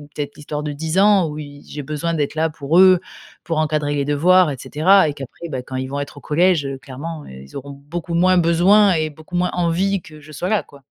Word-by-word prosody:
peut-être 145 -1 -5
l'histoire 150 0 -5
de 150 - -3
10 160 +4 -3
ans 200 -3 +5
où 150 - -7
y 145 -1 -9
j'ai 145 - -6
besoin 155 +4 -3
d'être 145 -3 -1
là 160 +1 0
pour 150 +4 +1
eux, 185 -2 +7 0.4
pour 165 -2 -2
encadrer 150 -1 0
les 140 - 0
devoirs, 170 +4 +4
et 135 - -5
cetera, 185 +5 +3
et - - -3
qu'après, 140 +4 -9
beh, 130 -3 -4
quand 130 - -8
ils 130 0 -2
vont 140 +1 -4
être 145 0 -6
au - - -10
collège, 165 0 +2
heu, 135 -1 -5
clairement, 145 +4 -7
heu, - - -12
ils 70 - -16
auront 140 +1 -7
beaucoup 155 +5 -6
moins 185 +2 +4
besoin 185 +4 +4
et 155 -1 -1
beaucoup 155 +4 -11
moins 180 +1 +1
envie 180 +3 0
que 155 -1 -14
je 155 +1 -14
sois 180 +6 -4
là, 215 - +1
quoi. 140 -1 -18
155 Hz, 245 wpm, -20 LUFS, 145-175 Hz, 0.4 s, eux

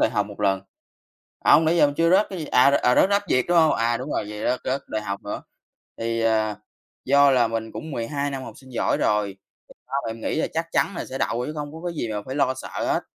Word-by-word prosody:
đại - - +3
học 105 -3 0
1 105 0 -11
lần. 95 -1 +2 0.9
Hông, 160 - +6
nãy 170 +2 +3
giờ - - +6
mình 145 0 -2
chưa 165 0 +3
rớt 195 +4 +4
cái 185 -3 -6
gì 155 - -4
à, 140 +1 +5
r - - 0
ờ, 125 -2 +3
rớt 190 - +5
Rap 200 0 +2
Việt, 130 -1 +2
đúng 175 -1 +3
hông? 160 -1 +5
À, 115 +1 +1
đúng 130 +4 -6
rồi, - - -1
vậy 105 - -7
rớt 125 - +1
rớt 135 +2 -1
đại 110 - -3
học 100 -1 -4
nữa. 105 - -5 0.6
Thì, 115 0 -1
ờ, 110 -2 +1 0.5
do 140 +1 +5
là 125 -3 +4
mình 110 0 -4
cũng 160 -1 -7
12 140 +4 -2
năm 135 -1 -5
học - - -9
sinh 130 -2 -15
giỏi - - +1
rồi, 105 -1 +1 0.5
thì - - -36
ba 130 - -22
mẹ 115 - -2
mình 115 0 -11
nghĩ - - -1
là - - +1
chắc 165 +1 -1
chắn 200 - +1
là - - -3
sẽ 135 +1 -6
đậu 120 0 -1
chứ 150 - -4
không 145 -1 -4
có 160 - -8
cái 170 - -3
gì 135 -7 -3
mà 105 -1 -3
phải 130 - -5
lo 140 -2 +1
sợ - - -7 0.2
hết. - - 0
130 Hz, 285 wpm, -24 LUFS, 115-150 Hz, 0.9 s, Hông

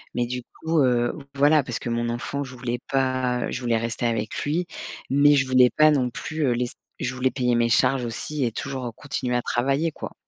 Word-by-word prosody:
Mais 120 - +1
du 125 +1 -4
coup, 160 +6 -2
heu, 120 -2 +2
v 150 - -9
voilà, 145 +2 +5
parce 125 -3 -4
que 120 - -5
mon 120 0 -1
enfant, 120 +4 -3
je 130 -2 -9
voulais 120 -1 -3
pas, 130 -2 +1
heu, - - -4
je 125 - -4
voulais 120 -2 +1
rester 115 +1 -2
avec 110 -2 -2
lui, 165 +5 0 0.5
mais 145 +2 +6
je 135 -1 +3
voulais 130 -1 +6
pas 155 +3 +5
non 130 -4 +2
plus, 155 +5 -3
heu, - - +3
laisser 120 0 -2 0.2
je 125 - -2
voulais 130 0 +1
payer 125 -2 0
mes 120 0 +3
charges 125 +2 +2
aussi 135 +5 -3
et 115 - -2
toujours 130 -3 -5
continuer 130 -3 -3
à 120 - +2
travailler, 135 +8 0
quoi. - - -8
125 Hz, 230 wpm, -24 LUFS, 120-140 Hz, 0.5 s, mais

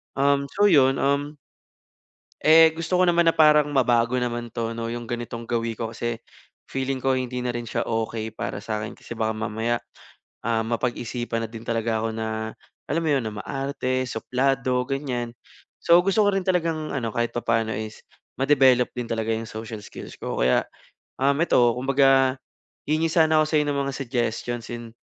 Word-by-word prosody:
Um, 140 0 +2
so 205 +1 +5
yun, 135 -2 +5
um, 140 +2 0 1.1
eh, 160 +1 +8
gusto 165 +2 -1
ko 185 - +4
naman 170 -1 +4
na - - -17
parang 150 -1 +6
mabago 120 -2 +2
naman 120 -1 -3
'to 115 0 -3
'no 115 0 -4
yung 120 0 -5
ganitong 120 -1 -5
gawi 115 -1 -2
ko 115 0 -3
kasi 120 -1 -3 0.5
feeling 135 0 -2
ko 135 0 +1
hindi 125 -1 -3
na 125 -1 -2
rin 120 - -3
siya - - -1
okey 110 -1 -3
para - - -4
sa'kin 110 -1 -4
kasi 120 - -9
baka 110 0 0
mamaya, 110 +2 -1 0.7
ah, 115 -1 +1
mapag-isipan 120 -1 -2
na - - -9
din 115 -1 -8
talaga 115 -1 0
ako 115 - -1
na 110 0 -3 0.4
alam 165 +3 0
mo - - +1
'yon, 135 - +2
na - - -2
maarte, 135 -2 -2
suplado, 125 +2 0
ganyan. 130 -4 -2 0.5
So, 170 +1 +7
gusto 195 +2 +2
ko - - +5
rin 195 - +1
talagang 165 -4 0
ano, 120 -5 -2
kahit 120 0 0
papaano 115 -1 0
is 110 +1 -6 0.4
ma-develop 135 -3 +4
din 120 - -2
talaga 115 -1 -2
'yong 115 +1 -3
social 110 0 -6
skills - - -10
ko - - -4
kaya, 65 +1 +3 0.6
um, 140 +1 +4
'eto 120 -8 +4
kumbaga 135 0 +3 0.5
hihingi 160 +2 +2
sana 160 -2 +4
ako - - 0
sa - - -3
'yo - - +1
ng 145 - 0
mga 140 - -2
suggestions 120 -2 -2
and 115 -1 -8
125 Hz, 175 wpm, -24 LUFS, 115-140 Hz, 1.1 s, eh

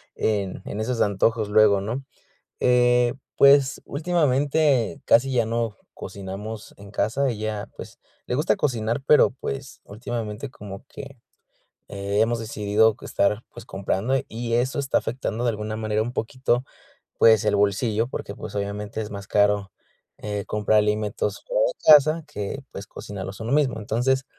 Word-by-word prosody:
en 100 -4 -1
en 105 - -5
esos 115 0 -1
antojos 105 +2 +1
luego, 105 -2 +5
¿no? 120 +7 -4 0.6
Eh, 125 -1 +4 0.2
pues 140 0 +5
últimamente 145 -4 +1
casi 130 +3 +4
ya 120 -3 +2
no 115 -2 -2 0.2
cocinamos 100 +3 -7
en 100 0 -13
casa. 130 +6 0
Ella, 110 -2 -4
pues, - - -10 0.3
le 125 - -1
gusta 150 +4 +2
cocinar, 120 -1 -1
pero, 150 - +6
pues, 135 +1 -6
últimamente 115 +2 -5
como 100 -2 -9
que, 140 -2 -10 0.7
eh, 100 +1 -2
hemos 115 +1 +1
decidido 110 0 +2
estar, 105 +3 0
pues, 120 - -11
comprando 95 +5 -1
y 115 +1 -3
eso 125 +4 0
está 135 -1 +1
afectando 120 -1 -3
de 120 - +3
alguna 110 0 -4
manera 110 -1 0
un 120 +2 -4
poquito, 125 +1 -1 0.5
pues, 110 -1 +6
el 105 -1 +2
bolsillo 105 +3 +1
porque, 100 -5 -6
pues, 105 - -8
obviamente 105 +2 -4
es 105 - -7
más 100 -1 -7
caro, 100 -2 +2 0.5
eh, 105 -1 -4
comprar 105 0 +2
alimentos 105 0 -1
fuera - - +1
de - - -1 0.2
casa 155 +2 +4
que, 105 +7 -5
pues, 100 - -7
cocinarlos 95 0 -8
uno 110 - -4
mismo. 140 -6 +2
Entonces, 125 +5 0
110 Hz, 150 wpm, -24 LUFS, 105-125 Hz, 0.7 s, pero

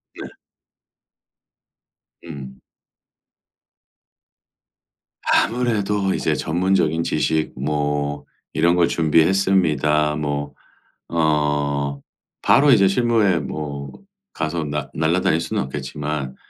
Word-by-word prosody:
네. - - -7 2.0
음. 65 -5 -9 2.7
아무래도 105 -5 +1
이제 - - 0
전문적인 85 -1 +1
지식 80 0 0
뭐 75 0 -2 0.3
이런 85 +3 +3
걸 85 -1 +3
준비했습니다. 80 -3 +2
뭐 75 -1 -3 0.6
어 75 -3 0 0.4
바로 145 +2 +4
이제 105 -6 +6
실무에 110 -4 +2
뭐 70 -1 -6 0.4
가서 80 +1 -2
나 75 -1 -4
날아다닐 80 +1 +1
수는 85 - -2
없겠지만 75 0 -5
80 Hz, 170 characters per minute, -21 LUFS, 75-90 Hz, 2.7 s, 이제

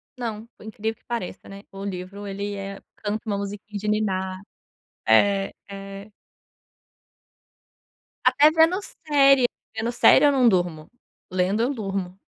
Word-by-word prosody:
Não, 230 -3 -5
por - - -14
incrível 220 +1 -4
que - - -37
pareça, 230 -6 -5
né, 200 0 -10
o 195 0 -8
livro 195 +1 -6
ele 200 +1 -4
é 195 0 -7 0.2
canta 210 +1 -3
uma 205 -2 -1
musiquinha 205 +1 -6
de 210 - -5
ninar. 190 -3 -1 0.7
É, 195 - +4 0.2
é. 195 +1 -9 2.1
Até 300 +2 +5
vendo 325 +4 +4 0.3
série, 275 -3 +5 0.3
vendo 230 +2 -1
série 255 +3 +6
eu 290 - +6
não 260 -3 +4
durmo, 175 -5 -1 0.4
lendo 185 +4 +1
eu 250 +4 +1
durmo. 195 -5 -4
205 Hz, 135 wpm, -24 LUFS, 195-230 Hz, 2.1 s, série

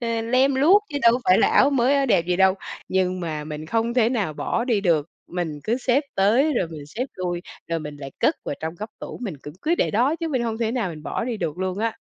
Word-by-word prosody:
ờ, 230 -1 -1
lem 255 +4 +3
luốc, 345 +10 +5
chứ 285 -3 -3
đâu 235 0 +7
có 250 - -1
phải 185 - +5
là - - +4
áo - - +5
mới, 265 0 +3
áo 275 -1 +2
đẹp 170 -8 +3
gì 180 0 +1
đâu. 190 0 +5 0.3
Nhưng 185 -1 0
mà 155 -3 -4
mình 155 0 -6
không 230 +5 0
thể 235 -3 +4
nào 215 -10 -1
bỏ 230 +9 -1
đi 230 -5 +1
được, 165 -6 +2 0.2
mình 170 -4 -4
cứ 230 +2 +1
xếp 260 +2 +2
tới, 235 +11 +3
rồi 180 -8 0
mình 150 -3 -9
xếp 235 - -3
lui, 175 -1 -3 0.3
rồi 165 - 0
mình 150 -2 -7
lại 135 -1 -8
cất - - +3
vào - - -3
trong 160 +1 -4
góc 210 +5 -7
tủ, - - -7
mình 190 -11 -4
cũng 150 +1 -9
cứ 325 +3 +2
để - - +1
đó, 250 +9 +2
chứ 330 -1 -3
mình 260 -6 0
hông 225 -1 -2
thể 230 -2 0
nào 235 -7 -1
mình 155 -2 -9
bỏ 225 - -3
đi 240 -3 -2
được 165 -4 -3
luôn 185 0 -2
á. 225 +1 -1
215 Hz, 275 wpm, -23 LUFS, 170-245 Hz, 0.3 s, đâu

